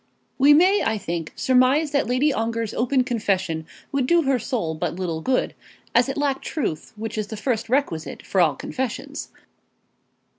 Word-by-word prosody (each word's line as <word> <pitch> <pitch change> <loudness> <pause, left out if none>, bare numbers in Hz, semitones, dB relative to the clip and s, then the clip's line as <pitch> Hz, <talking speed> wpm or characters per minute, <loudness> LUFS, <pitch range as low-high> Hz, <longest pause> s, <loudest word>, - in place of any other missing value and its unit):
We 290 +2 +7
may, 375 +6 +5
I 220 -1 0
think, 170 -5 -4
surmise 260 +4 +3
that 280 -1 +1
Lady 260 +4 +2
Ongar's 230 -1 -2
open 255 +2 +2
confession 190 - -1 0.2
would 275 -3 0
do 340 +2 +4
her 270 -2 +2
soul 215 - -2
but 160 - -3
little 170 -3 -3
good, 255 +8 0 0.4
as 240 +3 +4
it 270 - -3
lacked 285 -2 0
truth, 210 - -3
which 220 0 -4
is 210 - -2
the 220 - -6
first 230 0 -1
requisite 245 - -1
for 190 - +2
all 160 -4 +3
confessions. 255 -3 -4
240 Hz, 170 wpm, -23 LUFS, 200-270 Hz, 0.4 s, We